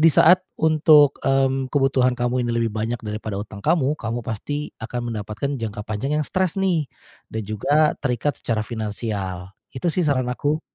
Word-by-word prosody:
di 165 - +7
saat 180 +3 +6 0.2
untuk, 155 -2 +5
mmm, 135 -1 +1
kebutuhan 135 -3 +3
kamu 125 +1 0
ini 120 - -1
lebih 115 -2 0
banyak 110 +2 -2
daripada 105 -1 -4
utang 105 -1 -8
kamu, 150 -3 +3
kamu 115 +1 -3
pasti 145 +7 -4
akan 120 +1 -4
mendapatkan 110 +7 -3
jangka 105 -2 -4
panjang 130 +8 -2
yang 150 - -1
stres 185 -2 0
nih, 175 -6 +1 0.4
dan 110 - -4
juga 145 +9 +2
terikat 125 0 -1
secara 115 -2 -1
finansial. 105 -5 -4 0.2
Itu 150 +7 -1
sih 185 - 0
saran 130 -4 +1
aku. 145 +5 -1
125 Hz, 170 wpm, -22 LUFS, 110-145 Hz, 0.4 s, di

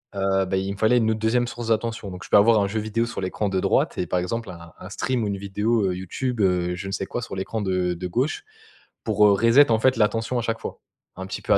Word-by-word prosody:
Heu, 95 0 +1
bah, 95 +1 -1
il 95 +1 -2
me 100 - -10
fallait 110 +4 +3
une 110 -2 +2
autre 110 - -2
2e 120 +2 +1
source 120 -1 -6
d'attention 110 -3 -1
donc 90 - -9
je - - -14
peux - - +6
avoir 110 +1 +5
un 100 - +1
jeu 110 +3 -2
vidéo 115 +2 -1
sur 115 - -5
l'écran 100 +2 -2
de 95 -1 0
droite - - +1
et 90 - -1
par 90 - 0
exemple 115 +4 -3
un 85 -1 -12
un - - -9
stream 125 -3 -2
ou 105 - -1
une 100 -1 -2
vidéo, 105 +3 0
heu, 90 - -1
YouTube, 110 +6 -3
heu, 90 -2 +1
je 90 - -7
ne - - -5
sais 95 - -2
quoi 120 - -4
sur 95 - -6
l'écran 100 +3 -3
de 90 -2 0
de 90 +2 -5
gauche 130 - -1 0.6
pour, 105 -1 +3
heu, - - +5
reset 115 +6 +5
en 110 - +3
fait 130 +2 +3
l'attention 115 +3 +1
à - - -1
chaque 115 -1 -2
fois. - - -7 0.4
Un 95 - -5
petit - - -6
peu - - +2
à - - +6
105 Hz, 285 wpm, -24 LUFS, 95-115 Hz, 0.6 s, peux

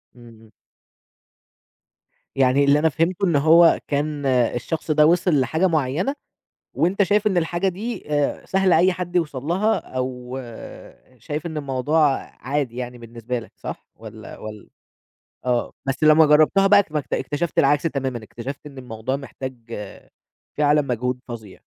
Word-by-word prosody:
اهم. 115 -2 -16 1.8
يعني 135 +1 +3
اللي 140 +1 +4
أنا 160 +1 +3
فهمته 175 +6 0
إن 170 -4 +1
هو 165 +4 +6
كان 145 0 -2
الشخص 130 +5 0
ده 150 0 +5
وصل 170 -2 +3
لحاجة 160 +9 +1
مُعيّنة، 160 - 0 0.6
وأنت 190 +4 +2
شايف 210 +3 +2
إن 190 -3 +2
الحاجة 175 +3 0
دي 215 +7 -5
آآ 145 -1 0
سهل 190 -1 +2
أي 180 +3 +5
حد 180 0 -4
يوصل 150 -6 -1
لها، 195 +7 +1
أو 125 0 -5 0.8
شايف 150 +8 -5
إن 160 -2 -5
الموضوع 140 +1 +1 0.2
عادي 135 -2 -2
يعني 125 -1 -5
بالنسبة 120 +1 -5
لك، 115 - -11
صح - - -8
والَّا - - -11
والَّا 105 -1 -9 0.8
آه، 120 -1 0
بس 135 +3 -2
لمّا 155 +1 +7
جرّبتها 155 +6 +4
بقى 200 0 +6
ما 150 - 0
اكت - - -7
اكتشفت 150 +3 -1
العكس 145 +2 +3
تمامًا، 135 -7 -2
اكتشفت 130 +7 -8
إن 140 -2 -11
الموضوع 125 +1 -4
محتاج 135 -1 -7 1.0
فعلاً 150 0 +4
مجهود 125 -1 -2
فظيع. 110 -5 -9
145 Hz, 145 wpm, -22 LUFS, 125-170 Hz, 1.8 s, لمّا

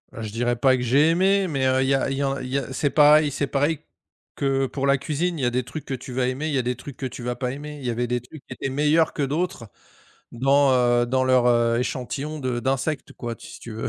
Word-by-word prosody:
Heu, - - -7
je 110 - -5
dirais 120 +2 0
pas 130 +2 +3
que 125 - -3
j'ai 140 +6 +4
aimé, 190 +3 +2
mais, 135 -5 -1
heu, 130 0 +2
il - - 0
y 135 - +3
a 135 - 0
il 135 - -2
y - - -1
a 135 -1 -1
il 125 - -5
y 135 - 0
a 135 -1 -4
c'est 145 +2 0
pareil 150 0 +5
c'est 140 +1 -2
pareil 145 +3 0 0.6
que 135 -1 0
pour 135 +1 -2
la 140 0 +4
cuisine. 160 +5 -2
Il - - -3
y - - +3
a - - +3
des 125 +1 -1
trucs 155 +5 -8
que - - -4
tu 125 0 -7
vas 125 0 0
aimer, 130 +5 -2
il 155 - -2
y - - +1
a - - +2
des 125 +1 -2
trucs 140 0 -10
que 135 - -5
tu 125 -1 -6
vas 125 0 -2
pas 125 0 -3
aimer. 150 +2 -7
Il 135 - -9
y - - 0
avait 120 +1 -1
des 125 0 -1
trucs 135 +5 -13
qui - - -8
étaient 135 - -4
meilleurs 150 +4 +2
que - - -4
d'autres 145 - -2 0.6
dans, 135 +3 +3
heu, 120 -1 +3
dans 130 +1 +1
leur, 130 -1 +3
heu, 120 -1 +3
échantillons 135 +4 -3
de 125 -3 -2
d'insectes 135 +3 -2
quoi, 120 -1 -5
t - - -13
si - - -11
tu 115 - -9
veux. 110 +1 -4
135 Hz, 295 wpm, -23 LUFS, 125-145 Hz, 0.6 s, pareil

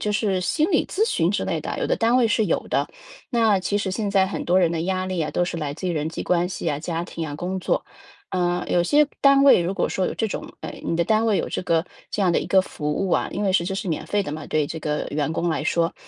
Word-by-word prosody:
就 210 - -1
是 200 -3 0
心 310 - +1
理 320 - +2
咨 435 +4 0
询 165 - +1
之 205 - -1
类 - - -1
的， - - -4
有 - - 0
的 - - +2
单 230 +2 +2
位 245 -2 +4
是 220 -1 +1
有 - - -1
的。 - - 0 0.4
那 225 -6 +3
其 200 +2 -1
实 205 -2 -1
现 205 +1 -2
在 195 -1 +3
很 190 - -5
多 180 +2 +4
人 170 -2 +3
的 165 - -1
压 185 +1 -1
力 185 -2 -2
啊， 155 - -1
都 175 - +1
是 170 -1 -4
来 145 -2 -3
自 185 +3 -4
于 - - 0
人 155 -1 -1
际 160 - -5
关 175 0 +1
系 185 - -6
呀、 145 -3 0
家 165 +1 -3
庭 165 -2 -5
啊、 145 - -5
工 185 +3 -3
作。 - - 0 0.5
呃， 175 -1 0
有 175 - +3
些 290 +11 +4
单 275 0 +6
位 275 - +7
如 185 +3 -2
果 - - 0
说 185 - -1
有 - - -4
这 225 - -1
种 210 - -6
呃， - - -6
你 165 - -1
的 170 - +2
单 220 +2 +2
位 215 -3 +2
有 - - -1
这 - - -3
个 165 0 +1 0.2
这 - - -3
样 185 -3 +3
的 - - +2
一 - - -5
个 190 - +5
服 150 -5 -4
务 190 +5 -1
啊 - - +1
因 205 - -3
为 190 - +2
是 170 -2 +2
这 190 +1 -3
是 195 - -4
免 160 - -2
费 205 -1 +1
的 145 - -5
嘛， 155 +1 -6
对 155 -2 +1
这 160 +2 -6
个 150 0 -2
员 150 +1 -1
工 170 +1 -1
来 160 - -1
说 165 +1 +1
185 Hz, 320 characters per minute, -23 LUFS, 165-205 Hz, 0.5 s, 位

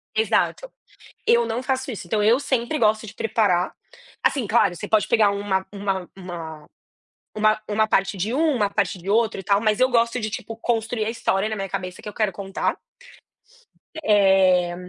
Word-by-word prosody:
exato. 475 +2 +1 0.6
Eu 235 0 +4
não 230 +3 -3
faço 260 0 -2
isso, 210 - -7
então 210 +4 0
eu 230 +5 +4
sempre 265 0 -1
gosto 220 -2 +2
de 210 - -11
preparar. 205 -6 +1 0.5
Assim 270 -5 +1
claro, 210 -5 +3
você - - -6
pode 215 -1 +2
pegar 215 -3 +4
uma 200 -1 -1
uma 195 -3 -3
uma 165 -5 -8 0.7
uma 215 0 +2
uma 215 +1 +1
parte 195 -1 +1
de 195 +4 -2
um, 310 +2 +2
uma 210 -4 +1
parte 195 - -1
de 180 +3 -7
outro 225 0 +2
e - - -7
tal 200 +1 +2
mas 215 0 +1
eu 255 0 +4
gosto 235 0 +1
de 215 -2 -3
tipo 220 +2 -6
construir 225 -1 -1
a - - -1
história 215 -3 -1
na 220 - -3
minha 195 -1 -4
cabeça 185 -1 -5
que - - -10
eu - - -11
quero 215 -2 0
contar. 195 +1 -3 1.3
Eh, 190 -4 +4
215 Hz, 185 wpm, -23 LUFS, 195-230 Hz, 1.3 s, Eu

